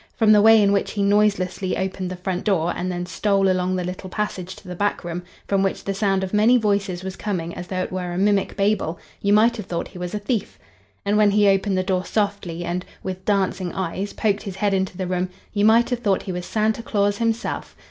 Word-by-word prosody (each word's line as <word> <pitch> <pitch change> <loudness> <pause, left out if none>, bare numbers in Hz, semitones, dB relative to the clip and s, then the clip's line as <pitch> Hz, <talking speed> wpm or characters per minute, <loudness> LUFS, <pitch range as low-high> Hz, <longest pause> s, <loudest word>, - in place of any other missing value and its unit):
From 220 -2 +4
the 210 -1 +7
way 225 +1 +7
in 200 - +4
which 200 -1 0
he 205 - 0
noiselessly 200 -2 +1
opened 190 -1 -3
the 185 - -4
front 180 0 -3
door 175 -5 +1
and 185 +1 -2
then 175 0 -3
stole 195 +2 +1
along 185 0 0
the 180 - -1
little 180 +1 -6
passage 190 -2 -3
to 200 - -15
the 180 - -5
back 205 +3 -1
room, 175 0 -4 0.3
from 195 -1 +2
which 195 -1 -1
the 195 - -2
sound 195 -1 +1
of 190 - -4
many 220 +4 +5
voices 200 -5 0
was 190 0 -5
coming 175 -5 -3
as 180 - -7
though 185 -1 -2
it - - -6
were 180 -1 -3
a 175 - -4
mimic 200 0 +1
Babel, 200 -5 +1 0.2
you 200 - +1
might 225 +3 +4
have 210 - -6
thought 170 - -3
he 180 - -11
was 180 +2 -4
a - - 0
thief. 210 +1 -2 0.5
And 205 +1 +2
when 210 -1 +5
he 205 0 +4
opened 195 0 +2
the 185 - +1
door 185 -1 0
softly 200 -5 -2
and, 175 +1 -2 0.2
with 185 0 -5
dancing 190 -3 0
eyes, 190 +2 -3
poked 210 -2 0
his 195 -3 -6
head 205 0 0
into 190 -1 -1
the 190 - -2
room, 180 0 -1 0.2
you 205 0 +2
might 230 +3 +5
have 245 - 0
thought 205 -5 +1
he 190 - -4
was 180 -1 -5
Santa 220 +1 0
Claus 205 -3 0
himself. 230 0 -2
195 Hz, 240 wpm, -22 LUFS, 185-210 Hz, 0.5 s, the